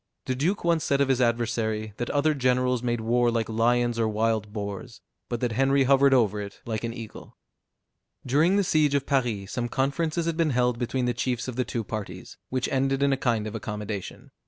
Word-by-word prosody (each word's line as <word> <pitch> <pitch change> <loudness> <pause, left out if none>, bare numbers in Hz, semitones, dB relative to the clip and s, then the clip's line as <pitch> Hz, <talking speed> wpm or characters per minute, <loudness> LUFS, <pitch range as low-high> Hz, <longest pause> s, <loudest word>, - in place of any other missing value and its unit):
The 130 - -1
duke 160 +11 -1
once 170 -2 +2
said 140 - +1
of 140 -1 +2
his 130 -1 +2
adversary, 115 -3 0
that 120 - -3
other 155 +2 +2
generals 125 -2 +1
made 120 -2 -1
war 120 +2 +2
like 115 -2 0
lions 120 +1 +1
or 115 - +2
wild 110 -1 0
boars; 105 +2 -6 0.3
but 120 -2 -3
that 120 -2 0
Henry 135 +3 +3
hovered 135 +1 +5
over 105 -5 +3
it 100 0 -8
like 110 -1 -3
an 115 - -2
eagle. 115 -2 -10 0.9
During 155 +9 +3
the 200 - +3
siege 155 -5 +2
of 140 -1 0
Paris, 120 -8 -1
some 120 -1 -2
conferences 155 +6 -1
had 165 -1 -1
been 165 -2 +2
held 125 -1 +1
between 125 +1 -1
the 120 - +1
chiefs 120 +1 -2
of 125 - -5
the 125 0 0
two 115 - -3
parties, 100 -4 -7
which 130 0 -1
ended 135 +1 +1
in 140 -1 +3
a - - +3
kind 120 -5 0
of 110 - -5
accommodation. 105 -2 -6
120 Hz, 205 wpm, -26 LUFS, 110-135 Hz, 0.9 s, hovered